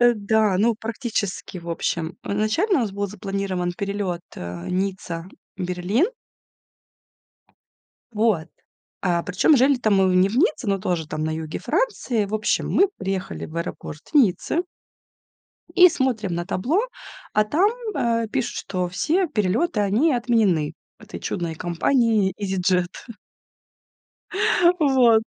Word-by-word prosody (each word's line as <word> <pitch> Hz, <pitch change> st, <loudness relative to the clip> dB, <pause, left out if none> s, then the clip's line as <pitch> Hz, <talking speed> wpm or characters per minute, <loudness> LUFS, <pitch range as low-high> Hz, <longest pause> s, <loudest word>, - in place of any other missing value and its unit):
Э, 240 Hz, 0 st, +6 dB
да, 210 Hz, -2 st, +2 dB
ну, 230 Hz, +2 st, +3 dB
практически, 220 Hz, -5 st, -4 dB
в 170 Hz, -, -10 dB
общем, 165 Hz, 0 st, -2 dB
изначально 215 Hz, -, +1 dB
у -, -, +1 dB
нас 205 Hz, -3 st, -3 dB
был 200 Hz, 0 st, -2 dB
запланирован 195 Hz, -2 st, -3 dB
перелёт, 195 Hz, -2 st, -3 dB
э, 85 Hz, 0 st, -6 dB
Ницца- 185 Hz, -2 st, -3 dB, 0.3 s
Берлин. 180 Hz, -, 0 dB, 2.0 s
Вот, 210 Hz, -7 st, +1 dB, 0.5 s
а 175 Hz, -2 st, +1 dB
причём 200 Hz, -, +3 dB
жили-то 255 Hz, -3 st, +3 dB
мы 190 Hz, -2 st, +4 dB
не 185 Hz, +2 st, +5 dB
в 220 Hz, -, -4 dB
Ницце, 300 Hz, -, +2 dB
но 195 Hz, -1 st, +1 dB
тоже 175 Hz, -4 st, -2 dB
там 155 Hz, 0 st, -3 dB
на 160 Hz, -, -1 dB
юге 160 Hz, -1 st, -5 dB
Франции. 260 Hz, -, 0 dB
В 210 Hz, -, -5 dB
общем, 215 Hz, 0 st, 0 dB
мы 390 Hz, -, +4 dB
приехали 190 Hz, -1 st, -3 dB
в 160 Hz, -, -10 dB
аэропорт 170 Hz, -2 st, -5 dB
Ниццы 270 Hz, -, +3 dB, 1.1 s
и 360 Hz, -1 st, +8 dB
смотрим 245 Hz, -, -1 dB
на 175 Hz, 0 st, -2 dB
табло, 270 Hz, -, +1 dB, 0.5 s
а 215 Hz, -, +3 dB
там, 355 Hz, -, +3 dB, 0.2 s
а, 230 Hz, -1 st, +1 dB
пишут, 255 Hz, +2 st, -2 dB
что 180 Hz, -2 st, -2 dB
все 325 Hz, -, +1 dB
перелёты, 215 Hz, -, 0 dB
они 225 Hz, +11 st, +2 dB
отменены 220 Hz, -11 st, +1 dB, 0.2 s
этой -, -, -10 dB
чудной 170 Hz, -2 st, -3 dB
компанией 205 Hz, -, +1 dB
"Изиджет". 185 Hz, -2 st, 0 dB, 1.9 s
Вот. 250 Hz, -6 st, +5 dB
200 Hz, 130 wpm, -23 LUFS, 180-240 Hz, 2.0 s, и